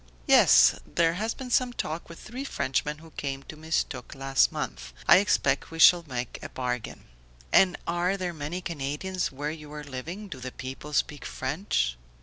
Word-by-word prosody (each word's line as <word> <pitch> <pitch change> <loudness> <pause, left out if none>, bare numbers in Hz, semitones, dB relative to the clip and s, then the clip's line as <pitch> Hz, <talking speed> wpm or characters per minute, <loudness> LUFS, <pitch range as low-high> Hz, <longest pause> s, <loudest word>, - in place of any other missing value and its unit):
"Yes, - - +7
there 165 -1 +1
has 220 +6 -2
been 255 -2 -7
some 250 0 +2
talk 165 -6 -4
with 170 - -10
three 250 +5 -7
Frenchmen 150 - -1
who 160 +1 -15
came 135 -2 -4
to 160 - -10
Mistook 160 -1 -3
last 135 0 +2
month. - - -5
I - - +9
expect 200 0 +2
we 165 - -8
shall 170 +1 +7
make 125 -2 -4
a - - -7
bargain." 125 -3 -4 0.5
"And 185 -2 +5
are 175 +3 0
there 180 -2 -3
many 160 +4 -4
Canadians 170 +4 -3
where 145 +3 -3
you 150 -2 -9
are 150 0 -6
living? 155 +10 -6
Do 135 -9 -8
the 130 0 -7
people 135 +3 -7
speak 145 0 0
French?" 130 - -1
155 Hz, 175 wpm, -27 LUFS, 135-180 Hz, 0.5 s, I